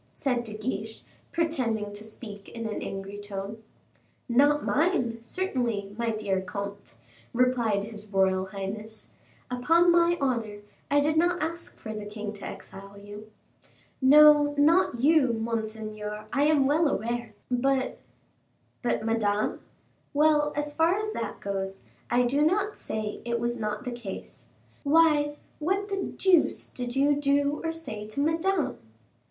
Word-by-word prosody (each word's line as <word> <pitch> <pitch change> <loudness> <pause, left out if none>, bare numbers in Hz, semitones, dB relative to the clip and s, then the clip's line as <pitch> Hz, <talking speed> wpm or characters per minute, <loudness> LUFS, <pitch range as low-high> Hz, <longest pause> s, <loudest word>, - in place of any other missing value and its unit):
said 250 -3 0
De 215 -2 -8
Guiche, 220 0 -4 0.3
pretending 240 -11 -1
to 205 +1 -8
speak 210 -2 -8
in 230 -1 -6
an 215 -1 -3
angry 195 +1 -6
tone. 205 +1 -6 0.7
"Not 285 +4 +3
mine, 290 -8 +1
certainly, 235 - -2
my 235 +1 -1
dear 205 -4 -1
comte," 200 +2 -6 0.4
replied 235 -5 +2
his 215 0 -7
royal 190 -1 +2
highness, 210 +3 -7 0.4
"upon 330 +8 +4
my 345 0 +4
honor, 230 -7 -1 0.3
I 290 0 +4
did 305 +2 +1
not 350 +2 +3
ask 335 +1 -3
for 220 - -6
the 210 -1 -6
king 210 0 -5
to 200 - -9
exile 195 +1 -10
you 205 +1 -10 0.4
" - - -34 0.2
"No, 295 -1 +7
not 305 -3 +4
you, 285 -4 +4
monseigneur, 215 -2 -4
I 285 0 +3
am 295 -3 +4
well 305 +4 +3
aware; 235 -2 -2 0.2
but 260 +1 +1 0.4
" - - -42
"But 240 -3 0
Madame; 215 -2 0 0.6
well, 295 0 +4
as 295 0 -2
far 325 +4 +3
as 430 +1 -2
that 225 -3 -4
goes, 195 -1 -3 0.3
I 245 +1 +3
do 265 +4 +1
not 395 +7 +2
say 215 -1 -4
it 235 0 -1
was 240 +1 -1
not 215 0 -3
the 250 - -3
case. 240 -5 -8 0.3
Why, 295 -1 +4 0.2
what 390 +6 0
the 395 - -1 0.2
deuce 365 -4 +3
did 245 -1 -5
you 285 +2 +4
do 285 0 +1
or 325 - 0
say 325 -11 -7
to 215 +5 -6
Madame?" 325 +4 +1
240 Hz, 145 wpm, -27 LUFS, 210-295 Hz, 0.7 s, No